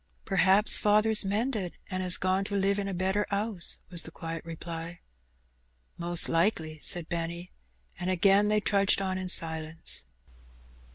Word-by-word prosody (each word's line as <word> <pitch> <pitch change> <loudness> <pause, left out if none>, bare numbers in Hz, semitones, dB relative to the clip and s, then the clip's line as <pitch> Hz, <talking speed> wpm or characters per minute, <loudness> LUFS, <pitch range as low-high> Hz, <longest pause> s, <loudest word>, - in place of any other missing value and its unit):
"P'r'aps 195 +1 +4
father's 215 +1 +3
mended, 205 -1 -2 0.2
and 185 0 -2
'as 180 -1 +4
gone 185 +1 0
to 200 - -4
live 200 +1 0
in 200 - -3
a - - -4
better 190 +3 -1
'ouse," 200 -3 -1
was 175 -2 -1
the - - -9
quiet 165 -1 -7
reply. 165 0 -8 1.0
"Mos' 175 0 +4
likely," 165 -3 -1
said 175 -2 +2
Benny, 170 +1 -5 0.5
and 180 - -3
again 195 +3 +3
they 210 0 +1
trudged 200 -1 +2
on 190 -1 -3
in 185 -1 -5
silence. 160 -2 0
185 Hz, 150 wpm, -28 LUFS, 170-200 Hz, 1.0 s, P'r'aps